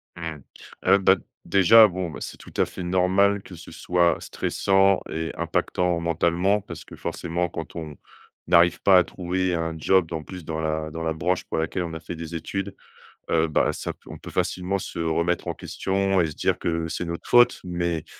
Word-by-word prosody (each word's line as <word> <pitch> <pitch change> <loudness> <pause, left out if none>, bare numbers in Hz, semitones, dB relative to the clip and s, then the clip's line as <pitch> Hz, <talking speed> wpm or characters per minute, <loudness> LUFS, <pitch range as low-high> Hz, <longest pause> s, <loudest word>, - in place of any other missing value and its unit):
Mmh. 80 -3 -6 0.5
Heu, 95 +1 +6
bah, 95 0 +5 0.3
déjà, 100 +5 +7
bon, 90 -2 -4
bah, - - -8
c'est - - -6
tout - - -14
à - - +4
fait 90 - -8
normal 95 +3 +2
que 90 - -11
ce 85 - -12
soit 85 -2 +1
stressant 95 0 +2
et 80 +1 -3
impactant 85 +1 0
mentalement 85 +4 +1
parce 85 -5 -10
que, - - -12
forcément, 85 +1 -3
quand 80 0 -7
on 80 -4 -7 0.5
n'arrive 85 0 +4
pas 95 -2 +6
à - - +3
trouver 90 0 -2
un 80 -1 -1
job, 90 +1 +2
en 80 - -4
plus, 90 -3 -9
dans 80 -1 -4
la 80 0 -2
dans 80 +1 -5
la 80 -1 0
branche 90 +3 -1
pour - - -4
laquelle 80 +3 -1
on 85 -2 -5
a 80 - -5
fait 85 - -7
des 80 0 -7
études, 95 +4 -4 0.5
heu, 80 0 +2
bah, 75 - +1
ça - - -5
pe - - -36
on - - -8
peut - - -10
facilement 90 +2 -1
se - - -7
remettre 85 +1 0
en - - -1
question 95 0 0
et 85 - +1
se 75 - -8
dire - - 0
que 80 -1 -1
c'est 85 - -4
notre 85 0 -6
faute. 120 0 +5
Mais 85 -2 -2
85 Hz, 205 wpm, -24 LUFS, 80-95 Hz, 0.5 s, déjà